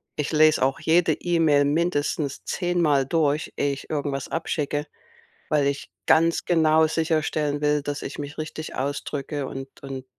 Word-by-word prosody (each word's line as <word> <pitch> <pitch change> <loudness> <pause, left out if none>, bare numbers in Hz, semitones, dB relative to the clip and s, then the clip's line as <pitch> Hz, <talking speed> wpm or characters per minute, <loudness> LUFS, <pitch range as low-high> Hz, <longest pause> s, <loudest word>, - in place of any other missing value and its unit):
Ich 150 - -2
lese 155 -2 +4
auch 135 +1 +1
jede 165 0 +3
E-Mail 160 -4 +2
mindestens 145 -2 -1
zehnmal 170 -7 +1
durch, 150 0 0
ehe 140 -1 +1
ich 135 - -9
irgendwas 145 -3 -3
abschicke, 150 -2 -2 0.6
weil 150 -2 +2
ich 140 0 -2 0.2
ganz 165 +1 +3
genau 160 -2 +4
sicherstellen 155 -2 0
will, 150 0 +1
dass 145 0 -4
ich - - -6
mich 145 0 -7
richtig 155 0 -6
ausdrücke 140 +1 -3
und 135 0 -7
und 135 -1 -6
150 Hz, 145 wpm, -24 LUFS, 140-160 Hz, 0.6 s, lese